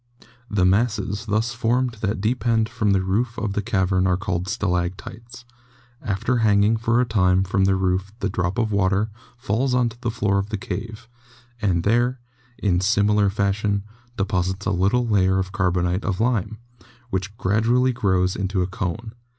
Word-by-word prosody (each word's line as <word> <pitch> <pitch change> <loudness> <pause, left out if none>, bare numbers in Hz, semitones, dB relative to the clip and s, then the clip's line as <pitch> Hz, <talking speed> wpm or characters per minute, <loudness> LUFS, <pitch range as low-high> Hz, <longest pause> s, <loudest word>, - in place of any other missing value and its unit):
The 100 -3 +2
masses 105 +1 0
thus 110 +3 0
formed 120 +1 0
that 105 0 -1
depend 115 0 +1
from 115 -3 -1
the 95 -1 +2
roof 115 +6 -1
of 105 -3 -2
the 105 - -1
cavern 95 -3 +1
are 90 -1 +2
called 95 -2 -3
stalactites. 100 +4 -3 0.6
After 110 +5 -1
hanging 105 -1 +3
for 115 +1 +1
a 125 - +3
time 95 -4 +2
from 95 0 +1
the 95 0 +3
roof 95 +1 -1
the - - -1
drop 90 +2 -2
of 115 -2 0
water 100 +2 +1 0.3
falls 125 +2 -1
to 120 -2 +1
the 120 - -1
floor 100 -4 0
of 100 +1 -3
the 110 - -2
cave, 110 +3 -6 0.5
and 90 -5 +1
there, 120 +4 +1 0.4
in 90 -3 +1
similar 105 +1 +3
fashion, 100 0 0 0.3
deposits 95 -1 -1
a - - +1
little 100 +7 +2
layer 95 -3 +3
of 95 0 -2
carbonate 90 -1 0
of 95 -1 -2
lime, 110 -2 0 0.5
which 95 +2 -3
gradually 115 +6 +2
grows 95 -4 +1
into 95 -1 -1
a - - -2
cone. 100 +4 -4
100 Hz, 165 wpm, -23 LUFS, 95-115 Hz, 0.6 s, hanging